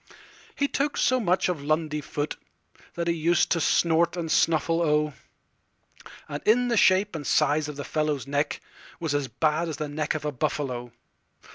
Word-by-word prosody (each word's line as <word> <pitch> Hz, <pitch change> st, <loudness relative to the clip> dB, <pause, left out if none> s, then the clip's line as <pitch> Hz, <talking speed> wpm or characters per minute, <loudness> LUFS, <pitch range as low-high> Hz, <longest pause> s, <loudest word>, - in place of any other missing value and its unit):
He 280 Hz, -, +1 dB
took 285 Hz, +1 st, -1 dB
so 255 Hz, 0 st, +3 dB
much 185 Hz, -5 st, +1 dB
of 170 Hz, -6 st, -3 dB
Lundy 155 Hz, 0 st, 0 dB
footThat 150 Hz, +3 st, -7 dB
he 170 Hz, -, +1 dB
used 170 Hz, +1 st, +1 dB
to 170 Hz, -, +2 dB
snort 170 Hz, +2 st, +2 dB
and 165 Hz, -2 st, -3 dB
snuffle—O!And 150 Hz, -2 st, -2 dB
in 240 Hz, +2 st, +3 dB
shape 200 Hz, 0 st, +4 dB
and 145 Hz, -3 st, -5 dB
size 150 Hz, 0 st, +2 dB
the 145 Hz, -1 st, -6 dB
fellow's 150 Hz, -3 st, -1 dB
neckWas 145 Hz, +2 st, -4 dB
as 145 Hz, -2 st, 0 dB
bad 155 Hz, +7 st, 0 dB
as 155 Hz, -, -5 dB
the 150 Hz, -, -3 dB
neck 150 Hz, +1 st, -2 dB
of 150 Hz, -, -4 dB
a 150 Hz, -, 0 dB
buffalo. 125 Hz, -2 st, -3 dB
155 Hz, 145 wpm, -26 LUFS, 145-170 Hz, -, shape